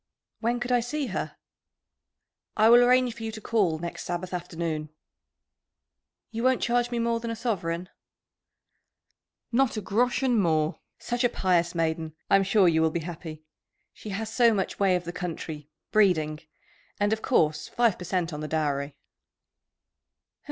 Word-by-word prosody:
"When 240 +1 0
could 245 +1 -3
I 245 - +4
see 280 +5 -2
her?" - - -4 1.2
"I 220 +1 +6
will 240 +1 +8
arrange 250 0 +4
for 230 - -12
you 225 0 -3
to 220 - -6
call 205 -8 +1
next 170 +2 -6
Sabbath 175 +1 -4
afternoon." 165 -3 -3 1.4
"You 230 - -4
won't 255 +1 +2
charge 240 0 +1
me 240 - -3
more 230 0 0
than 230 0 -5
a 230 - -2
sovereign?" 180 -7 -2 1.6
"Not 250 -1 +2
a - - -2
groschen 245 +4 +1
more! 160 -4 +1 0.2
Such 240 +1 -2
a 245 - +4
pious 175 -4 +1
maiden! 160 -1 -1 0.2
I'm 195 - +6
sure 195 -1 +4
you 160 -1 +3
will 160 - +3
be 165 +1 -3
happy. 160 -2 -8 0.5
She 215 - -10
has 220 +3 -4
so 235 -2 +4
much 190 -2 -2
way 195 -2 +3
of 180 - -2
the 175 0 -6
country 160 -4 -6 0.2
[breeding]. 160 -8 +3 0.6
And, 205 +1 +2
of 220 - -3
course, 155 - +1
five 235 -5 +1
per - - -6
cent 175 -2 -1
on 150 - -5
the 155 - -4
dowry?" 145 -2 -1
190 Hz, 160 wpm, -27 LUFS, 165-235 Hz, 1.6 s, will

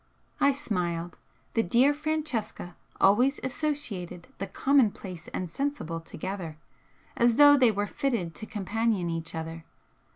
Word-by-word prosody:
I 280 - +5
smiled. 175 - -3 0.3
The 225 - +3
dear 240 +9 +4
Francesca 290 - -3 0.2
always 245 +8 +4
associated 250 - -3
'the 195 - -3
commonplace 205 - +1
and 180 -3 -4
sensible' 275 - -3
together, 170 -1 -6 0.6
as 235 -1 +3
though 290 +1 +8
they 255 -5 +5
were 205 0 -1
fitted 205 -7 -2
to 220 - -7
companion 210 -3 -1
each 165 0 -4
other. 165 0 -5
210 Hz, 125 wpm, -28 LUFS, 175-270 Hz, 0.6 s, though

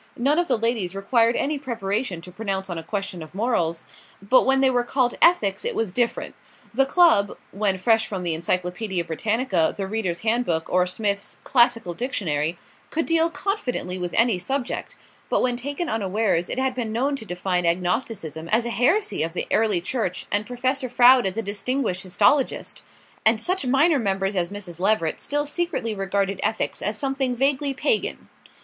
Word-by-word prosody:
None 280 +7 +2
of 350 - 0
the - - +2
ladies 220 -5 -1
required 230 +4 +2
any 290 0 -1
preparation 215 -6 -2
to 180 - -11
pronounce 195 -1 -3
on 170 - -3
a - - -8
question 195 -1 -4
of 155 +3 -11
morals; 175 -7 0 0.3
but 200 +8 +3
when 270 0 +4
they 265 0 +4
were 245 -1 +1
called 245 0 +1
ethics 205 - +4
it - - -1
was 225 -5 -1
different. 240 +4 -1 0.4
The 270 +3 +3
club, 295 - +4
when 200 -1 0
fresh 220 +3 +2
from 190 -3 -4
the 170 -2 0
"Encyclopaedia 180 +3 -1
Britannica," 190 0 0
the 195 - -2
"Reader's 190 -4 -2
Handbook" 220 -8 0
or 180 0 +3
Smith's 200 +1 -2
"Classical 235 -7 +2
Dictionary," 170 - -2 0.3
could 325 +1 -1
deal 330 0 +2
confidently 255 - -2
with 175 -1 -3
any 230 -5 +3
subject; 265 +6 -3 0.3
but - - +2
when 250 -1 +1
taken 285 +7 -4
unawares 205 - 0
it - - -2
had 260 0 0
been 240 -3 -3
known 265 +6 0
to 225 - -8
define 180 -2 -1
agnosticism 175 - -2
as 230 +2 +2
a 235 - -2
heresy 295 - +1
of 165 +1 -2
the - - -2
Early 215 -5 +2
Church 185 -2 -2
and 205 +1 0
Professor 255 +2 -1
Froude 245 -1 +6
as 190 +2 -3
a 225 - -1
distinguished 205 -1 -2
histologist; 205 +9 +1 0.4
and 220 0 +4
such 360 +3 -1
minor 285 +4 +4
members 195 -2 -1
as 175 -2 0
Mrs. 190 -4 -7
Leveret 190 -4 +1
still 290 0 -1
secretly 300 -7 -2
regarded 195 -1 -1
ethics 220 - -1
as 210 +2 -1
something 270 -2 -1
vaguely 275 +2 +1
pagan. 440 - 0
220 Hz, 175 wpm, -24 LUFS, 185-255 Hz, 0.4 s, Froude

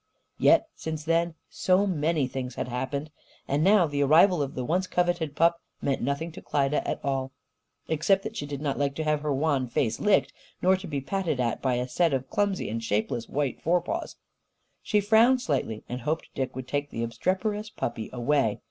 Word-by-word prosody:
Yet, - - +5
since 155 -1 -5
then, 165 +1 +1
so 185 +2 +2
many 160 -5 +1
things 125 -1 -5
had - - -3
happened! 140 +4 -3 0.4
And 145 +3 +1
now 195 -1 +6
the 145 -2 -2
arrival 160 +4 +5
of 140 -1 -3
the 125 - -3
once 180 +5 0
coveted 175 -5 0
pup 170 +1 +3 0.2
meant 135 -1 -1
nothing 140 +6 -2
to - - -10
Klyda 140 0 +1
at - - -2
all 135 -1 -1 0.5
except 190 +5 +2
that 220 0 -6
she 145 - -4
did 140 -1 -5
not 140 -2 -1
like 140 -1 0
to 160 - -2
have 150 -1 +1
her 150 -1 -1
wan 140 -2 +1
face 115 -1 0
licked, 210 -1 +3 0.3
nor 185 +1 +4
to 190 0 -7
be 145 -4 -3
patted 170 -2 -2
at 120 -2 0
by 130 -2 +1
a 125 +1 -1
set 165 +3 +1
of 130 0 -5
clumsy 200 -2 0
and 115 +2 -3
shapeless 110 +2 -1
white 140 -2 -2
forepaws. 175 +1 -1 0.7
She 210 -1 +1
frowned 225 +5 +5
slightly 130 - -2
and 125 +1 -5
hoped 155 +5 -2
Dick 130 -2 -3
would 130 -1 -6
take 145 +1 -2
the 115 - -3
obstreperous 190 - -1
puppy 115 - -4
away. 125 -3 +1
150 Hz, 195 wpm, -27 LUFS, 130-175 Hz, 0.7 s, now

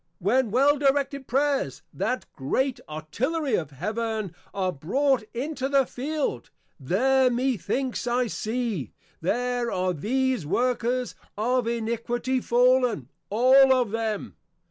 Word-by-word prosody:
When 235 +7 +2
well 275 +6 +3
directed 280 -1 +1
Prayers, 270 - 0
that 245 - -2
great 255 - -1
Artillery 250 - -2
of 160 -8 0
Heaven, 215 - -3 0.2
are 185 -2 -1
brought 260 - +1
into 265 +2 -3
the 275 -1 +4
Field, 270 - -3 0.3
There 255 - +3
methinks 255 +1 -1
I 245 +1 +2
see, 220 - -3 0.3
_There 245 +6 0
are 185 0 0
these 255 - 0
workers 245 +7 0 0.2
of 245 +2 +1
Iniquity 235 +2 -1
fallen, 245 - +2 0.2
all 260 +5 +6
of 250 -5 +3
them! 220 -2 -3
245 Hz, 115 wpm, -26 LUFS, 210-265 Hz, 0.3 s, all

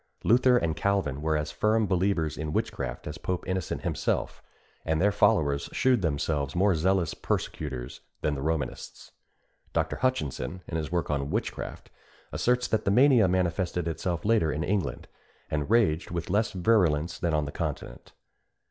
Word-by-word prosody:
Luther 125 +2 +5
and 80 -8 0
Calvin 95 -9 0
were 80 0 +1
as 75 0 -3
firm 110 +7 +2
believers 90 -4 0
in 75 0 -4
witchcraft - - -3
as 75 +2 -6
Pope 90 -1 -2
Innocent 95 -2 -2
himself; - - -1 0.4
and 80 -1 0
their 100 +4 +4
followers 70 -7 +2
shewed 130 -4 +3
themselves 75 -3 -1
more 95 +2 +4
zealous 90 +1 +1
persecutors 65 -5 -4 0.2
than 75 - 0
the 70 - -4
Romanists. 80 +1 -4 0.6
Dr. - - 0
Hutchinson, 90 - -2
in 80 - -5
his 80 0 -4
work 85 -3 -1
on 70 -1 -1
Witchcraft, - - -4 0.4
asserts 125 0 +1
that 110 -1 +1
the - - +1
mania 120 -1 +5
manifested 90 -1 0
itself 85 +2 -2
later 105 -8 +3
in 75 +2 -2
England, 100 0 -2 0.4
and 75 +1 -1
raged 105 -9 +2
with 85 0 -4
less 105 +2 +2
virulence 90 -5 +2
than 85 -3 0
on 75 -1 +1
the 70 - -5
continent. - - -5
85 Hz, 155 wpm, -28 LUFS, 75-100 Hz, 0.6 s, Luther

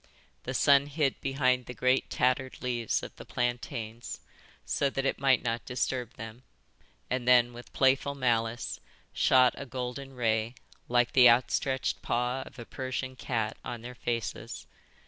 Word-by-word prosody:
The 130 - -3
sun 140 +1 +5
hid 145 -2 0
behind 130 -2 +1
the 125 - -7
great 130 +1 +2
tattered 130 +1 0
leaves 120 -3 -1
of - - -8
the - - -9
plantains 120 -1 -3 0.5
so 140 - +1
that 135 0 -2
it - - 0
might 135 -2 +3
not 115 0 -1
disturb 125 -1 -2
them, 115 +2 -9 0.7
and 125 -1 -2
then, 120 -1 +5
with 120 +1 -11
playful 135 +1 +2
malice, 120 -3 0 0.3
shot 130 -1 +5
a 140 - -6
golden 130 +1 -5
ray, 115 0 0 0.3
like 120 0 +3
the 125 -2 +8
outstretched 130 +2 +1
paw 125 +2 -1
of - - -14
a 120 - -8
Persian 130 +1 -4
cat, 115 -3 -2
on 120 -1 -6
their 125 +1 -7
faces. 120 -2 -4
125 Hz, 150 wpm, -29 LUFS, 120-130 Hz, 0.7 s, the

